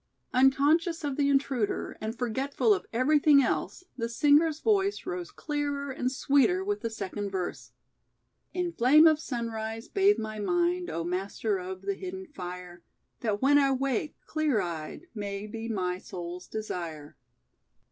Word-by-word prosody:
Unconscious 290 +6 +3
of 285 -2 -2
the 280 0 +2
intruder 270 -6 0
and 220 +2 -4
forgetful 250 -1 +1
of 185 -2 -3
everything 285 +4 +5
else 365 - -2
the 230 -2 -2
singer's 295 +5 +4
voice 400 -1 +1
rose 360 -1 -4
clearer 285 -2 -3
and 255 -1 -1
sweeter 285 +8 +3
with 410 +1 -2
the 230 - -2
second 205 -1 -4
verse. 185 -2 -4 0.8
"In 360 -1 -2
flame 295 +6 +6
of 310 -2 +6
sunrise 225 -4 -4
bathe 400 +1 +3
my 215 -1 -5
mind, 350 - +1
O 165 - -3
Master 195 +3 -2
of 185 +1 -7
the 200 0 -1
Hidden 375 - -7
Fire, 180 -2 -8 0.4
That 215 -2 -1
when 290 +1 +6
I 275 -1 +3
wake, 270 +1 -1
clear 310 -7 +1
eyed 170 - -5
may 200 -2 -4
be 225 +2 -6
My 180 -4 -1
soul's 175 0 -7
desire." 170 -8 -5
250 Hz, 145 wpm, -28 LUFS, 200-300 Hz, 0.8 s, flame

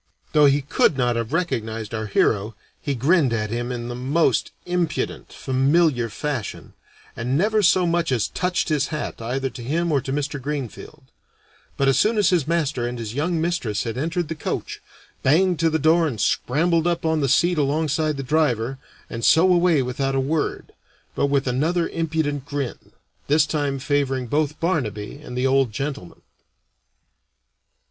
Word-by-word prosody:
Though 150 -1 +6
he 140 0 +2
could 140 0 +2
not 120 -2 +1
have 115 +1 -3
recognized 115 - -2
our 110 -1 -3
hero, 105 +1 +1 0.3
he 140 - -2
grinned 140 0 +3
at 110 -2 -2
him 120 +1 -2
in 120 -1 -4
the 120 - -4
most 135 +7 +1 0.2
impudent, 175 -1 -2
familiar 135 -1 +1
fashion, 135 +1 -5 0.4
and 125 +4 -1
never 215 +5 +2
so 180 -1 +4
much 170 -2 0
as 115 -5 +1
touched 180 -1 -1
his 150 -2 +1
hat 155 -6 -5
either 130 +3 -2
to 125 - -9
him 165 +7 -1
or 140 -3 +2
to 135 - -5
Mr. 145 0 -2
Greenfield; 145 +1 -6 0.7
but 140 - +2
as 135 0 +3
soon 220 +1 +2
as 200 -4 +3
his 165 -6 +1
master 150 -7 0
and 120 0 -5
his 115 -2 -5
young 160 +5 0
mistress 160 - -1
had 115 -2 -4
entered 165 +5 -2
the 165 - -3
coach, 155 - -4 0.4
banged 170 +5 +3
to 165 0 +3
the 160 - +1
door 160 +2 +3
and 120 -8 -4
scrambled 165 - +1
up 170 -1 -1
on 160 -1 +2
the 135 - +1
seat 170 +5 +3
alongside 150 +1 0
the 135 - -4
driver, 135 -3 0 0.3
and 115 - -6
so 175 - +5
away 170 -5 +3
without 135 +2 -2
a - - +2
word, 145 +3 -2 0.4
but - - +1
with 140 -1 +1
another 160 +7 0
impudent 160 -4 -2
grin, 140 -4 -5 0.4
this 150 +1 +4
time 145 -3 -1
favoring 135 -2 0
both 150 +4 -1
Barnaby 135 - -2
and 125 - -7
the 125 - 0
old 135 -3 +3
gentleman. 135 -5 -5
145 Hz, 170 wpm, -23 LUFS, 125-160 Hz, 0.7 s, Though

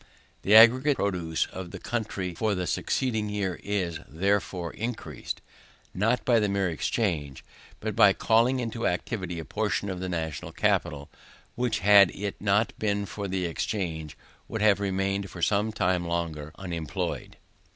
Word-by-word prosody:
The 105 - +4
aggregate 130 +6 +7
produce 85 -5 0
of 95 -1 -7
the 95 - -7
country 100 -4 -3
for 105 +4 0
the 90 -1 -2
succeeding 110 +1 -1
year 100 -3 -2
is, 90 -5 -2
therefore, 95 -1 -1
increased; 110 - -5 0.5
not 115 +6 +1
by 120 -2 +4
the 105 -2 +1
mere 100 -2 0
exchange, 80 - -2 0.4
but - - -3
by - - +7
calling 120 +4 +3
into 115 -1 -2
activity 90 -1 -3
a 80 - -5
portion 100 -2 -1
of 90 - -5
the 95 0 -3
national 80 -4 -4
capital, 75 -4 0 0.4
which, 120 -4 -1
had 100 -1 +7
it 100 0 -5
not 105 +2 +2
been 100 -1 0
for 100 0 -5
the 95 -1 -1
exchange, 80 -4 -3 0.3
would 110 -2 -3
have 105 -2 +5
remained 95 0 -1
for 90 -2 -7
some 105 +1 +2
time 90 -4 +1
longer 80 -3 -3
unemployed. 85 -6 -4
100 Hz, 150 wpm, -27 LUFS, 85-105 Hz, 0.5 s, aggregate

